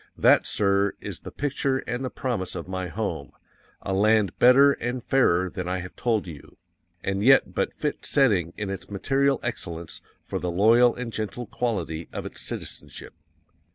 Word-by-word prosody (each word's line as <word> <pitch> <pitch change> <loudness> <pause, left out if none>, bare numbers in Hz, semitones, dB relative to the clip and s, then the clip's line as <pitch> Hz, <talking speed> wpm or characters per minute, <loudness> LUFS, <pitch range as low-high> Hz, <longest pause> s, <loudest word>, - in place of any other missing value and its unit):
_THAT, - - +5
SIR, 100 0 +2
is - - -7
the - - -9
picture 140 -1 -1
and 120 +2 -3
the 130 - -2
promise 120 -10 -3
of - - -6
my 95 -1 -3
home 85 -7 -4 0.5
A 95 - -2
LAND 105 -1 +3
BETTER 135 +3 +7
AND 120 -2 -3
FAIRER 95 -9 +2
THAN 90 -3 -5
I 90 +1 -1
HAVE 90 0 -8
TOLD 115 -4 0
YOU, 80 -5 -11 0.5
and 100 0 -1
yet 135 +3 +5
but - - 0
fit 150 - -4
setting 100 - +2
in 105 -2 -3
its 95 -1 -6
material 135 +6 +1
excellence 85 -8 -5 0.2
for - - -4
the 90 - -3
loyal 115 +7 +4
and 120 -2 -6
gentle 110 +3 -4
quality 90 -9 -3
of - - -6
its - - -6
citizenship. - - -6
105 Hz, 170 wpm, -25 LUFS, 95-125 Hz, 0.5 s, BETTER